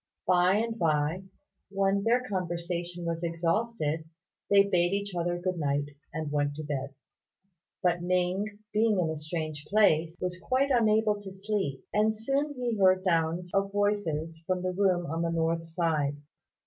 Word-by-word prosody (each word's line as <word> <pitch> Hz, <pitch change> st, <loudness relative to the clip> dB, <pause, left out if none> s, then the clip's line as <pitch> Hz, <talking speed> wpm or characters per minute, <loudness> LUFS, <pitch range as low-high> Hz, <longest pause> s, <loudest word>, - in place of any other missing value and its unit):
By 180 Hz, +1 st, +4 dB
and 225 Hz, +1 st, -1 dB
by, 160 Hz, +2 st, +1 dB, 0.4 s
when 195 Hz, 0 st, +1 dB
their 245 Hz, +3 st, +3 dB
conversation 175 Hz, -2 st, -3 dB
was 165 Hz, 0 st, -2 dB
exhausted, 165 Hz, -1 st, -1 dB, 0.5 s
they 200 Hz, -1 st, +7 dB
bade 180 Hz, -2 st, +2 dB
each 200 Hz, -1 st, -2 dB
other 175 Hz, 0 st, -1 dB
good 180 Hz, 0 st, -2 dB
night 145 Hz, -1 st, 0 dB, 0.2 s
and 155 Hz, -2 st, -4 dB
went 145 Hz, -1 st, 0 dB
to 155 Hz, -, -5 dB
bed; 140 Hz, -2 st, -4 dB, 0.9 s
but 175 Hz, -1 st, +2 dB
Ning, 180 Hz, +2 st, +1 dB, 0.3 s
being 215 Hz, -1 st, +3 dB
in 165 Hz, -3 st, +1 dB
a -, -, -3 dB
strange 155 Hz, -1 st, -4 dB
place, 170 Hz, -4 st, +3 dB
was 180 Hz, 0 st, -3 dB
quite 265 Hz, +6 st, +1 dB
unable 215 Hz, -3 st, +3 dB
to 195 Hz, -1 st, -8 dB
sleep; 190 Hz, -8 st, -3 dB
and 215 Hz, +1 st, +2 dB
soon 275 Hz, +6 st, -1 dB
he 245 Hz, -3 st, -1 dB
heard 185 Hz, -1 st, +5 dB
sounds 170 Hz, 0 st, 0 dB
of 195 Hz, 0 st, +1 dB
voices 165 Hz, -6 st, -1 dB
from 185 Hz, -1 st, 0 dB
the 185 Hz, 0 st, -1 dB
room 180 Hz, -2 st, +2 dB
on 165 Hz, +1 st, -2 dB
the 170 Hz, -, 0 dB
north 165 Hz, 0 st, 0 dB
side. 160 Hz, -4 st, 0 dB
180 Hz, 160 wpm, -29 LUFS, 165-200 Hz, 0.9 s, they